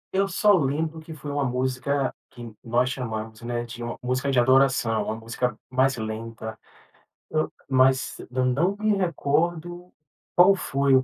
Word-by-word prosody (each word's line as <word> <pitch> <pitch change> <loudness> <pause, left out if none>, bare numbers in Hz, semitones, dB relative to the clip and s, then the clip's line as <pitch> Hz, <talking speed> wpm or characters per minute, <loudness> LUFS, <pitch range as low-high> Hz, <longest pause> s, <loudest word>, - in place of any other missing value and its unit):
Eu 195 +1 +3
só 205 +1 +4
lembro 160 0 0
que 160 +1 -11
foi 145 0 -7
uma 145 0 0
música 130 +2 -1 0.2
que 120 -2 -10
nós 120 +2 +1
chamamos, 110 -3 -5
né, 120 0 -3
de 120 0 -9
uma 120 0 -4
música 130 +2 -1
de 130 -3 +3
adoração, 130 -3 +3
uma 110 - -2
música 115 +2 -3
mais 130 +1 +2
lenta. 110 0 -5 0.7
Eu 155 0 0 0.2
mas 130 0 +3
eu 130 0 +1
não 155 +10 +2
me 215 0 +2
recordo 175 0 -1 0.4
qual 185 +3 +7
foi 140 -6 +2
o 130 - +4
130 Hz, 160 wpm, -25 LUFS, 120-155 Hz, 0.7 s, qual